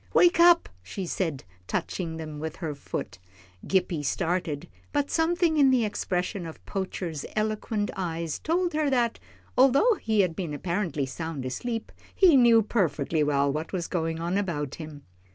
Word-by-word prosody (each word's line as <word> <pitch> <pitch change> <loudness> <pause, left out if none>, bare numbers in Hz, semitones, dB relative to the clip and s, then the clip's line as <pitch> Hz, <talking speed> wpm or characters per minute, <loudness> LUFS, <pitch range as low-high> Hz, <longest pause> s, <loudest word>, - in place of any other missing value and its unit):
"Wake 350 -1 +5
up," 345 0 +7
she 140 - -5
said, 165 -6 -2 0.2
touching 165 -3 -3
them 155 -2 -6
with 160 +1 -4
her 160 -4 -4
foot. 95 -9 -6 0.5
Gippie 180 -5 +1
started, 170 0 -1 0.2
but 290 -1 0
something 330 0 +2
in 280 -2 +6
the 250 -3 +3
expression 180 -2 -2
of 160 - -11
Poacher's 180 -6 -4
eloquent 215 0 -1
eyes 165 -4 -3
told 345 +2 0
her 305 -1 +1
that, 240 -3 +1 0.4
although 275 - +5
he 220 -2 +2
had 180 -4 0
been 165 -5 -3
apparently 170 -3 -1
sound 150 0 -5
asleep, 225 - -4 0.2
he 360 -6 +6
knew 235 -3 +6
perfectly 165 -7 0
well 140 -1 +2
what 155 +5 -4
was 175 -3 -1
going 165 -2 -2
on 175 +4 0
about 150 -8 -2
him. 150 -2 -9
180 Hz, 155 wpm, -27 LUFS, 160-235 Hz, 0.5 s, up